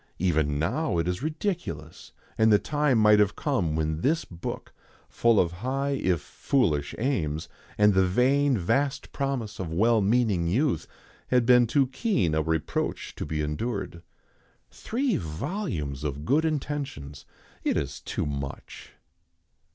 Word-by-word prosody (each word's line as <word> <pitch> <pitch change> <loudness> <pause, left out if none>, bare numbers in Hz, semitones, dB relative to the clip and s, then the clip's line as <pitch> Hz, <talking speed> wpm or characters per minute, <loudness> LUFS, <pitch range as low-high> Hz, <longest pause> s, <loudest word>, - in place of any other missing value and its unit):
Even 80 -5 +1
now 135 - 0
it 85 - +1
was 90 0 -2
ridiculous, 165 +5 -4 0.2
and 110 0 +4
the 105 - +7
time 145 +2 +1
might 105 -1 +6
have 105 -1 +3
come 100 - 0
when 80 0 -1
this 160 - +1
book, 85 -1 -7 0.3
full 115 -2 +3
of 85 - +2
high, 130 +9 -2
if 95 - +1
foolish 75 - 0
aims, 85 - -1 0.3
and 105 0 +5
the 95 0 +4
vain 130 +6 +3
vast 135 +9 0
promise 135 -6 -3
of 90 -4 -4
well 110 +6 +3
meaning 100 -5 +2
youth, 130 - +1 0.4
had 125 -2 +3
been 125 -1 +6
too 135 +4 +3
keen 130 - 0
a 80 - +2
reproach 80 0 -2
to - - -6
be 75 -1 -2
endured. 85 +3 -3 0.7
Three 250 -1 -1
volumes 80 - -4
of 75 0 -4
good 155 - +2
intentions! 140 - -4 0.4
It - - +1
is 70 0 -3
too - - -3
much. 70 -2 -6
105 Hz, 145 wpm, -27 LUFS, -, 0.7 s, the